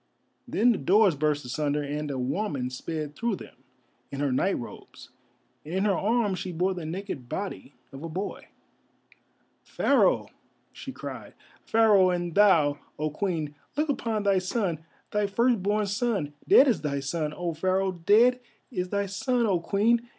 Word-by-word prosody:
Then 240 +2 +3
the 220 - -1
doors 190 +4 +4
burst 150 -1 0
asunder 145 +3 -1
and 150 +1 -3
a 135 - -3
woman 130 -1 -2
sped 150 +3 -5
through 235 -3 -1
them - - -12 0.6
in 140 - -5
her 145 -2 +1
night 190 +10 +1
robes, 120 - -10 0.5
and 160 +4 -6
in 190 +2 +1
her 205 - +3
arms 210 -1 +1
she 185 0 -4
bore 180 +3 0
the 175 -4 -6
naked 165 -8 -6
body 195 -7 -5 0.2
of 135 - -10
a 165 - -5
boy. 185 +6 -5 1.2
"Pharaoh!" - - +2 0.4
she - - -8
cried, - - -8 0.3
"Pharaoh, 210 -4 +5
and 175 -1 -2
thou, 160 -8 +4 0.2
O 155 0 -2
Queen, 160 -3 -2 0.2
look 305 +1 +1
upon 225 -6 -1
thy 200 -2 +3
son—thy 185 +1 -3
firstborn 210 -1 +1
son—dead 200 - +2
is 245 - +2
thy 140 -2 -1
son, 150 +3 -2
O 175 +1 -3
Pharaoh! 185 +4 0
Dead 215 +8 +4 0.3
is 180 -6 -3
thy 200 0 0
son, 225 +5 0
O 190 -5 +2
Queen! 230 +7 +1
185 Hz, 155 wpm, -27 LUFS, 150-210 Hz, 1.2 s, Pharaoh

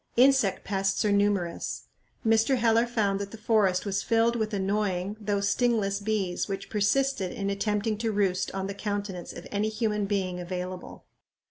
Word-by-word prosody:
Insect 260 -5 +4
pests 195 +1 0
are 210 - +3
numerous. 200 -4 0 0.4
Mr. 225 +4 +4
Heller 230 0 +3
found 205 -5 0
that 200 0 -4
"the 225 - -10
forest 210 -4 +2
was 195 -1 0
filled 230 +1 +2
with 220 -2 -1
annoying, 200 -1 -1
though 205 -1 0
sting 230 +3 +2
less, 200 -1 -1
bees 200 -4 -1
which 195 -1 -5
persisted 210 -1 +1
in 200 -1 -2
attempting 210 +1 -1
to 225 -1 0
roost 195 -3 0
on 190 0 -3
the 200 - -4
countenance 200 -3 -4
of 170 - -9
any 210 +1 0
human 210 -2 -1
being 190 -3 -1
available." 180 +1 -6
205 Hz, 165 wpm, -27 LUFS, 195-220 Hz, 0.4 s, Insect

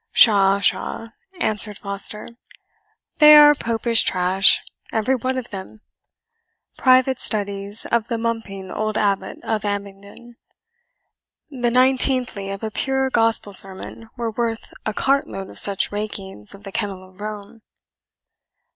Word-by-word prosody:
"Pshaw, 200 -3 +5
pshaw," 225 +3 -2 0.3
answered 210 - 0
Foster, 200 +1 -2 0.9
"'they 300 0 +9
are 295 0 +8
Popish 230 -3 +1
trash, 185 +1 +3 0.3
every 225 +4 0
one 260 +1 -2
of 250 -2 -6
them 200 +2 -9 0.9
private 260 0 +3
studies 200 0 -1
of 235 -1 -1
the 230 - -3
mumping 225 -5 -5
old 215 0 -3
Abbot 195 -2 -1
of 220 -2 -2
Abingdon. 200 +3 -7 1.1
The 245 -3 -1
nineteenthly 255 -4 +2
of 195 +2 -7
a 220 - -4
pure 265 +2 -1
gospel 225 -3 0
sermon 195 +4 +2
were 235 -1 -3
worth 230 0 -4
a 215 - -2
cartload 270 -8 -1
of - - -3
such 200 -2 0
rakings 200 - -6
of 200 - -17
the 195 - -9
kennel 195 -3 -5
of 185 +2 -19
Rome." 210 +1 -8
215 Hz, 130 wpm, -21 LUFS, 200-235 Hz, 1.1 s, they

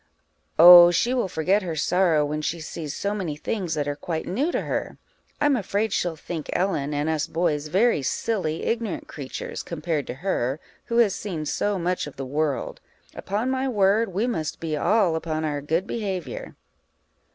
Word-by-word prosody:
_ - - -40 0.5
Oh, 175 +1 +11
she 235 +8 +1
will 245 -6 0
forget 185 +4 +1
her 170 -4 -4
sorrow 165 -1 +2
when 150 +1 -3
she 165 +2 -2
sees 155 -2 -6
so 200 +1 -2
many 180 -8 -3
things 175 +1 -3
that 145 -2 -1
are 145 - -1
quite 160 +2 -4
new 270 - -1
to - - -1
her. - - -3 0.4
I'm 290 -2 +3
afraid 210 -1 -1
she'll 175 -2 0
think 160 0 -6
Ellen, 175 -6 0
and 145 +1 -1
us 160 -2 0
boys, 160 -3 -1
very 195 +2 +2
silly, 165 - -2
ignorant 230 -5 -2
creatures, 135 -3 -6
compared 160 -3 -3
to - - -5
her, 140 -4 -1 0.3
who 235 - -2
has 225 -5 +4
seen 170 -7 -4
so 205 +6 -1
much 180 -2 -1
of 145 - -10
the 135 - -5
world: 145 +1 -2 0.3
upon 215 +6 -2
my 265 0 0
word, 205 -1 +2
we 200 +6 0
must 160 -11 -3
be 160 -2 -2
all 175 +2 +2
upon 160 -1 -2
our 145 -2 -2
good 160 +6 0
behaviour. 195 -6 -4
170 Hz, 185 wpm, -24 LUFS, 155-205 Hz, 0.5 s, Oh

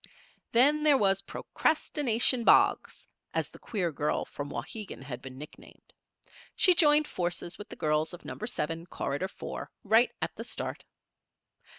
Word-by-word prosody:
Then 285 +6 +5
there 300 -2 +5
was 195 -4 +2
"Procrastination 255 -5 0
Boggs," - - +3 0.3
as - - -1
the - - -14
queer 185 -6 -2
girl 150 +1 -1
from 145 0 -6
Wauhegan 210 -7 -6
had 130 -3 -7
been 130 -1 -10
nicknamed. 150 +3 -13 0.6
She 365 - +6
joined 300 -3 +5
forces 175 0 -4
with 205 - -9
the - - -8
girls 155 +1 0
of 175 - -11
Number 220 - -5
Seven, 165 -6 -3
Corridor 145 +2 -3
Four, 190 - -7
right 225 +4 +4
at - - -3
the - - -6
start. - - -5
195 Hz, 150 wpm, -29 LUFS, 155-255 Hz, 0.6 s, She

